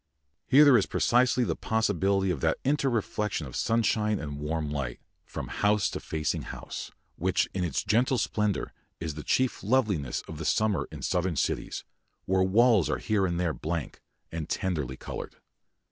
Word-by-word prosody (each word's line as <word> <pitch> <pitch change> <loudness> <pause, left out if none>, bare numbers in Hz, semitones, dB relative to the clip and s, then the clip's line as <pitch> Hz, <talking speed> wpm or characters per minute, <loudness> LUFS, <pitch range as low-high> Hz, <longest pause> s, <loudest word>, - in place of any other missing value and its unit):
Here 140 +3 +7
there 135 -5 +7
is - - -1
precisely 125 +1 +3
the - - -1
possibility 100 -3 +1
of - - -3
that 80 -1 +2
inter 140 0 +2
reflection 105 -6 -1
of 65 - -9
sunshine 110 -2 +1
and 75 -3 -5
warm 75 0 -2
light, 70 -5 -3 0.3
from - - -6
house 105 0 +1
to - - -4
facing 75 -1 -2
house, - - -7 0.3
which - - +1
in 95 - -1
its 85 -6 -1
gentle 125 +4 +2
splendour 105 -4 -1 0.3
is 80 -2 -3
the 75 - -6
chief 130 +10 +1
loveliness 100 - +1
of 80 +1 -5
summer 100 -9 +1
in - - -8
southern 90 -1 0
cities, - - -2 0.4
where 95 0 +2
walls 105 - +4
are - - +1
here 100 -3 +1
and 85 -1 -2
there 85 -3 0
blank, 80 -2 -4 0.3
and 80 -1 -5
tenderly 75 -10 -2
coloured. - - -7
95 Hz, 165 wpm, -28 LUFS, 80-110 Hz, 0.4 s, Here